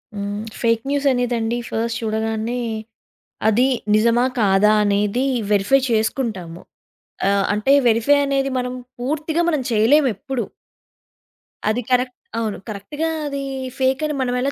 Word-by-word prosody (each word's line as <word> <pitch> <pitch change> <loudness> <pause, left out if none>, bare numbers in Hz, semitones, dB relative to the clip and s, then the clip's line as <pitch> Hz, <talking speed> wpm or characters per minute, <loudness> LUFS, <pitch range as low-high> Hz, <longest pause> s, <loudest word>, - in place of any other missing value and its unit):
హ్మ్. 205 +1 -3 0.2
Fake 230 -1 +2
news 285 0 0
అనేదండి, 240 -2 0
first 230 +1 -2
చూడగానే 220 +2 -2 0.9
అది 245 +5 +3 0.3
నిజమా? 235 +3 +3 0.2
కాదా? 205 +1 +4
అనేది 205 +5 +1 0.3
వెరిఫై 205 +7 +4
చేసుకుంటాము. 215 -6 -1 0.7
ఆహ్, 200 -1 +2
అంటే, 215 +6 +2
వెరిఫై 235 +6 +4
అనేది 275 -1 0
మనం 250 0 -3 0.3
పూర్తిగా 310 +5 -1
మనం 305 -4 0
చేయలేమెప్పుడు. 245 +1 +2 1.3
అది 240 +3 0
కరెక్ట్. 250 0 +2 0.2
అవును. 220 -3 -2
కరెక్ట్‌గా 290 +11 -4 0.2
అది 280 -1 -3 0.4
ఫేకని 265 +3 +1
మనం 250 -1 0
ఎలా 275 +2 0
235 Hz, 115 wpm, -21 LUFS, 215-270 Hz, 1.3 s, కాదా